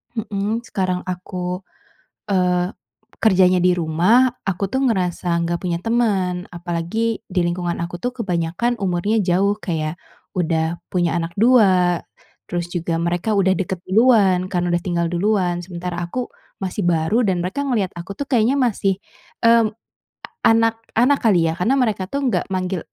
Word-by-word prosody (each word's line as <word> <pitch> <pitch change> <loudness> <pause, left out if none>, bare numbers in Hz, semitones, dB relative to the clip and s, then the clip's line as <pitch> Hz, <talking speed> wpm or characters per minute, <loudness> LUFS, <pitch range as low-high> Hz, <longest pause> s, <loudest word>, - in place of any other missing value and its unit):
mmm, 215 +1 -2
sekarang 185 -3 -1
aku, 180 0 -4 0.7
eee, 180 -1 +1 0.5
kerjanya 185 -4 +5
di 180 0 +4
rumah. 180 +11 +3 0.2
Aku 195 0 -1
tuh 265 - +1
ngerasa 180 -5 0
nggak 170 0 -1
punya 175 -2 -1
teman, 195 -6 0
apalagi 175 +7 -2
di 185 -1 +1
lingkungan 175 0 -2
aku 175 +1 -4
tuh 245 - 0
kebanyakan 180 +5 -1
umurnya 195 +4 +1
jauh 195 +2 +2
kayak 160 -6 -3 0.4
udah 165 -1 0
punya 175 -2 +1
anak 165 0 -3
2 190 -7 +4 0.5
terus 175 -1 -2
juga 170 -2 -1
mereka 175 +5 -1
udah 190 -1 +3
deket 190 +1 -2
duluan 195 -4 +4
karena 175 -2 0
udah 175 - +1
tinggal 170 -2 -1
duluan. 180 -1 +1
Sementara 175 -1 -5
aku 245 +8 -4 0.3
masih 190 +2 -3
baru 170 +6 +2
dan 185 -3 +1
mereka 190 +10 -3
ngelihat 215 -8 0
aku 175 +3 -7
tuh 285 - -3
kayaknya 245 +1 +3
masih, 200 -6 +1 0.5
eee, 230 -1 +5 0.8
anak-anak 225 +4 +3
kali 185 -7 +3
ya, - - -3
karena 230 +10 +2
mereka 215 -6 0
tuh 280 0 -2
nggak - - 0
manggil, 185 0 -1
185 Hz, 145 wpm, -20 LUFS, 175-220 Hz, 0.8 s, kerjanya